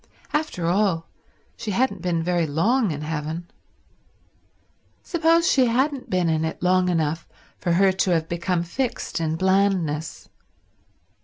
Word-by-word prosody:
After 300 - -1
all, 175 -2 +1 0.5
she 230 - -6
hadn't 205 -2 0
been 170 -2 0
very 175 -1 +1
long 215 - +2
in 150 -2 -4
heaven. 160 +2 -4 1.5
Suppose 335 -1 +2
she 260 -3 +4
hadn't 265 +3 0
been 180 -2 +1
in 160 -1 +1
it 160 +2 -4
long 180 0 +3
enough 165 -1 -1 0.3
for 175 - 0
her 190 +2 +4
to 190 0 0
have 165 -2 +1
become 170 +1 -1
fixed 240 +2 -3
in 160 -1 0
blandness? 185 -4 0
180 Hz, 135 wpm, -23 LUFS, 165-210 Hz, 1.5 s, she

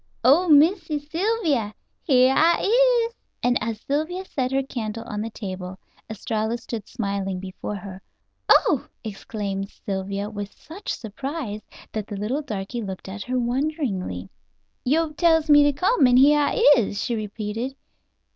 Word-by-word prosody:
"Oh, 310 +9 +5
Missy 310 +1 +4
Sylvia, 305 - -1 0.3
here 260 -3 +4
I 335 +2 +4 0.5
is," 465 - -16 0.3
and 245 0 +3
as 220 0 -3
Sylvia 315 +7 -2
set 260 -7 -2
her 270 0 +1
candle 230 -4 -5
on 210 -3 -4
the 225 - -3
table, 185 -4 -6 0.3
Estralla 220 +1 -2
stood 230 -2 -7
smiling 200 -3 -3
before 190 +2 -6
her. 195 -1 -8 0.5
"Oh!" - - +4 0.2
exclaimed 200 -2 -4
Sylvia 195 0 -4
with 205 -1 -6
such 350 +6 -7
surprise 240 0 -5 0.3
that 215 -2 -4
the 205 - -6
little 230 +9 -1
darky 225 -3 -4
looked 190 -3 -6
at 200 +2 -6
her 255 0 -1
wonderingly. 240 - -2 0.5
"Yo' 310 +4 +1
tells 320 -1 +3
me 290 0 +8
to 290 - +4
come, 295 - +3
an' 250 0 +5
here 290 +3 +6
I 290 - +2
is," 205 -3 -1
she 240 - -1
repeated. 215 +4 -4
235 Hz, 145 wpm, -24 LUFS, 205-290 Hz, 0.5 s, me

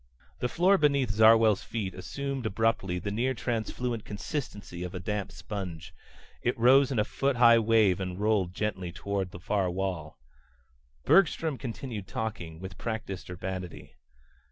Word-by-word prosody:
The 125 - -1
floor 190 +6 +4
beneath 140 -6 +3
Zarwell's 110 0 +5
feet 100 -5 -4
assumed 135 +6 -4
abruptly 105 -3 0
the 100 +3 -3
near 125 +5 0
transfluent 115 0 -2
consistency 105 - -5
of 90 +1 -6
a - - -3
damp 105 +1 -3
sponge. 90 -6 -6 0.5
It 120 - 0
rose 130 +3 +5
in 130 - -1
a 105 - +4
foot 135 +4 -1
high 115 -1 +7
wave 110 -4 +3
and 90 -1 -4
rolled 105 -4 +1
gently 95 -3 -3
toward 95 +2 -3
the 90 - -10
far 95 +1 0
wall. 90 -4 -3 0.9
Bergstrom 165 -5 +3
continued 115 -5 -6
talking, 90 -8 -5
with 95 0 -8
practiced 105 -6 -5
urbanity. 90 -6 -6
105 Hz, 145 wpm, -29 LUFS, 95-120 Hz, 0.9 s, high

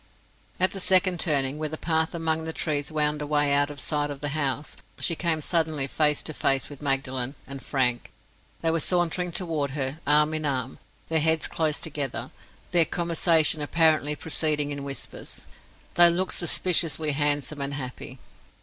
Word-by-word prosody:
At 185 +1 +3
the 195 - -6
second 185 -1 +4
turning, 145 -3 +3
where 155 -1 -2
the 155 - -6
path 160 0 0
among 160 -1 -1
the 160 0 -5
trees 150 -2 -2
wound 150 -1 0
away 145 -1 +1
out 145 0 +2
of 145 -1 -9
sight 145 +1 -1
of 145 -1 -7
the 145 0 -3
house, 145 -1 -2 0.2
she 170 - +1
came 160 -2 0
suddenly 155 -3 0
face 150 +1 +1
to 155 - -5
face 135 -2 0
with 140 - -11
Magdalen 135 -1 -2
and 135 0 -8
Frank: 125 -4 0 0.5
they 165 - +1
were 165 - 0
sauntering 175 +1 +1
toward 160 -5 -1
her, 135 +2 -2
arm 150 +1 +4
in 155 0 -2
arm, 130 -3 -3 0.3
their 160 -1 +3
heads 160 0 +3
close 155 -2 -1
together, 145 -4 -3 0.4
their 170 -2 +5
conversation 165 -2 +2
apparently 155 -1 +2
proceeding 150 -1 0
in 140 -1 -5
whispers. 140 -1 -7 0.5
They 175 0 +8
looked 180 +2 +1
suspiciously 165 -3 +1
handsome 145 0 -1
and 140 0 -2
happy. 130 -1 -7
150 Hz, 170 wpm, -25 LUFS, 140-160 Hz, 0.5 s, They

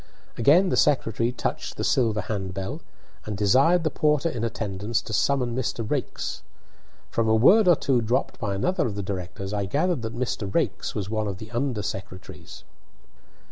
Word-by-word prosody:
Again 160 - +5
the - - 0
secretary 120 -6 +2
touched 125 - -4
the - - -2
silver 110 -5 +2
handbell, 95 -1 -4 0.5
and 105 -2 -3
desired 135 - +4
the 155 - 0
porter 150 +2 +2
in 115 -6 -4
attendance 110 -1 -2
to 110 - -7
summon 125 -1 +1
Mr. 115 -3 -2
Raikes. - - -3 0.7
From 115 -1 +1
a 110 - +4
word 190 - +6
or 175 - +7
two 130 -4 +1
dropped 120 +4 -1
by 100 -5 -2
another 180 - 0
of 105 - -4
the 100 - -3
directors 95 +1 -5
I 100 -1 -1
gathered 150 - 0
that 115 +1 -5
Mr. 115 -5 -2
Raikes - - -1
was 100 0 -3
one 110 -1 -1
of 100 -2 -4
the 110 +2 -10
under 120 -3 -1
secretaries. 95 -2 -8
115 Hz, 175 wpm, -25 LUFS, 100-135 Hz, 0.7 s, or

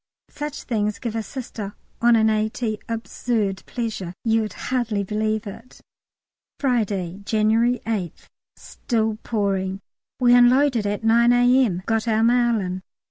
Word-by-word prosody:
Such 295 0 -6
things 210 -3 -1
give 230 -2 -5
a 225 - 0
Sister 215 -3 -7 0.3
on 240 0 +5
an 220 -1 +4
A.T. 215 0 -1
absurd 225 -3 -2
pleasure; 215 -7 -4
you'd 225 -1 +1
hardly 230 -5 -1
believe 215 +2 -1
it. 225 +5 -10 0.8
Friday, 205 -8 -1
January 220 +4 +2
8th. 205 -7 -4 0.3
Still 220 -3 -2
pouring. 195 -3 -1 0.4
We 245 -1 +5
unloaded 245 -1 +4
by 205 0 0
9 235 +2 +5
A.M., 245 -6 +3
got 225 0 0
our 220 0 +2
mail 240 -1 +3
in. 185 0 -4
220 Hz, 130 wpm, -23 LUFS, 205-240 Hz, 0.8 s, on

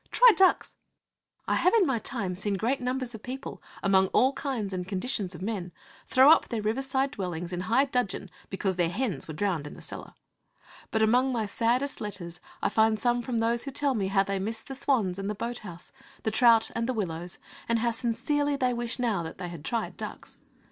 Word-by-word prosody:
Try - - +7
ducks!' 380 -1 +3 0.7
I - - +2
have 365 +5 +3
in 425 -5 +5
my 265 -6 +1
time 220 -6 -3
seen 200 +2 -1
great 245 +7 0
numbers 250 0 -2
of 220 - -8
people, 260 +3 -7 0.2
among 190 -1 +4
all 260 +7 +3
kinds 250 -9 -3
and 180 -1 -3
conditions 195 -2 -2
of 180 - -8
men, 195 -4 -3 0.4
throw 265 +3 +7
up 325 - +5
their 225 -3 -3
riverside 265 +4 0
dwellings 175 -3 -4
in 175 - -2
high 230 +9 +3
dudgeon 225 -8 -2 0.2
because 190 -1 -2
their 175 -2 +2
hens 215 +3 -2
were 155 - -6
drowned 170 -5 -1
in - - -9
the - - -12
cellar. - - -6 0.7
But 220 -1 +1
among 250 +4 +3
my 230 -3 0
saddest 240 +6 0
letters 175 -5 -6 0.2
I - - +3
find 220 -1 +3
some 240 +1 +1
from 240 0 -3
those 230 +2 +1
who 275 - -4
tell 280 0 +1
me 200 -5 -1
how 195 0 +3
they 195 0 -2
miss 220 +3 -3
the 270 - -8
swans 230 -9 0
and 195 +1 -3
the 210 - -2
boat 235 +3 -4
house, 175 -4 -10 0.3
the 220 - 0
trout 230 0 +5
and 230 +2 -1
the - - +1
willows, 175 -4 -4 0.3
and 230 - +3
how 235 +1 +1
sincerely 270 +6 0
they 255 -3 +1
wish 240 0 -2
now 230 -7 0
that 160 -1 -7
they 175 - -5
had 170 -4 -9
tried 230 +5 -3
ducks. - - -8
225 Hz, 210 wpm, -28 LUFS, 190-255 Hz, 0.7 s, Try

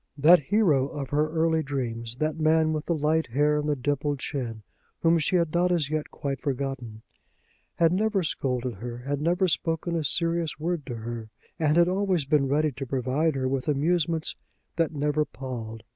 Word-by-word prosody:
That 165 +5 +7
hero 150 -4 +2
of 140 -3 -6
her 150 +1 +2
early 160 0 +1
dreams, 120 -5 -4
that 155 +4 -2
man 155 0 +3
with 155 0 -3
the 170 - +1
light 155 +1 +1
hair 150 +5 +2
and 150 0 -2
the 145 - +2
dimpled 145 +2 -1
chin, 120 -6 -4 0.4
whom 165 0 +4
she 160 +4 0
had 170 -3 +1
not 175 +1 +2
as 155 -5 0
yet 155 -1 -2
quite 140 -3 -4
forgotten, 130 -6 -4 0.7
had 165 0 +3
never 205 0 +1
scolded 125 -5 -2
her, 120 +3 -6
had 145 0 -1
never 175 +4 +2
spoken 165 0 -1
a 165 - 0
serious 165 +1 0
word 165 -3 -2
to 120 - -4
her, 115 0 -6 0.3
and 155 0 +2
had 175 0 +6
always 185 -4 +1
been 140 -1 +2
ready 150 +2 +2
to 135 +1 -6
provide 135 +5 0
her 130 -1 0
with 135 +1 -2
amusements 160 +2 +1 0.4
that 165 -1 +1
never 150 0 +1
palled. 115 -6 -7
150 Hz, 185 wpm, -26 LUFS, 135-165 Hz, 0.7 s, That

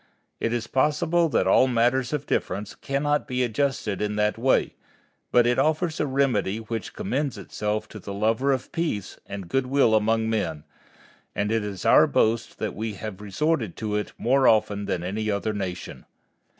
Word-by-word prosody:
It 115 - -1
is 120 -2 -1
possible 160 +7 +2
that - - +2
all 130 - +5
matters 125 +1 +2
of 145 -2 -2
difference 100 -4 -2
cannot 145 +2 -1
be 125 -2 0
adjusted 120 -4 -1
in 105 0 -1
that 105 0 +1
way, 130 +3 +2 0.6
but 120 -1 +5
it 120 0 +2
offers 160 +1 +1
a 150 - +1
remedy 130 -7 +1
which 110 -2 -5
commends 135 +5 -2
itself 105 +1 -3
to 105 - -9
the 100 - -8
lover 110 +7 +1
of 130 -2 -2
peace 160 - -3
and 100 -3 -6
good 130 +8 0
will 135 -4 +3
among 110 +1 +2
men, 100 -9 -2 0.7
and 105 +1 0
it 115 -1 +1
is 100 -3 -6
our - - +6
boast 115 +1 +1
that - - -3
we 110 +1 -4
have 105 -1 -7
resorted 110 - -1
to 105 -2 -2
it 105 - -2
more 130 +3 +3
often 105 -2 +2
than 85 - -2
any 105 +4 -2
other 105 +1 -1
nation. 95 -3 -5
115 Hz, 175 wpm, -25 LUFS, 105-135 Hz, 0.7 s, our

